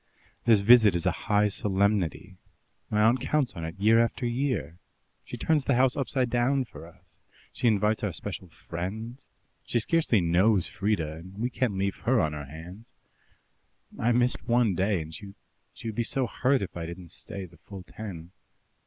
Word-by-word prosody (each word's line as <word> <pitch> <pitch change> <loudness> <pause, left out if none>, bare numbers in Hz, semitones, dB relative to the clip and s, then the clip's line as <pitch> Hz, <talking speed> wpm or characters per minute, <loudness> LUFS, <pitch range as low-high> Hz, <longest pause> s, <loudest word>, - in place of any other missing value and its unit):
"This 110 -4 +5
visit 110 -3 +7
is 85 0 -2
a 95 - +3 0.2
high 105 0 +4
solemnity. 100 -2 -1 0.5
My 105 0 +2
aunt 120 +3 +4
counts 140 -1 0
on 85 -4 -7
it 80 +1 -6
year 110 +3 +5
after 120 +2 -3
year. 120 - -2 0.4
She - - -8
turns 155 -3 +1
the 140 - +2
house 130 +1 +3
upside 130 -3 -1
down 125 +3 +2
for 85 - -12
us; 85 - -22 0.3
she 120 - 0
invites 105 0 +2
our 105 - 0
special 95 +2 -6
friends 100 - -7 0.4
she 120 - 0
scarcely 140 -3 +2
knows 90 +3 +3
Frieda, 85 -7 -2
and 95 +4 -12
we 120 +4 -2
can't 120 -6 -1
leave 100 0 -1
her 125 0 +2
on 80 -5 +1
her 75 -1 -6
hands. 85 - -11 1.1
I 115 - +2
missed 120 +1 +1
one 120 -3 +3
day, 95 0 +1
and 80 +1 -11
she 100 +3 -9 0.5
would 110 - -3
be 120 - 0
so 130 +3 0
hurt 130 0 +1
if 95 - -7
I 85 -1 -4
didn't 85 0 -9
stay 100 -1 -7
the 85 -1 -17
full 95 +3 -10
ten." 90 -5 -9
105 Hz, 180 wpm, -27 LUFS, 90-120 Hz, 1.1 s, visit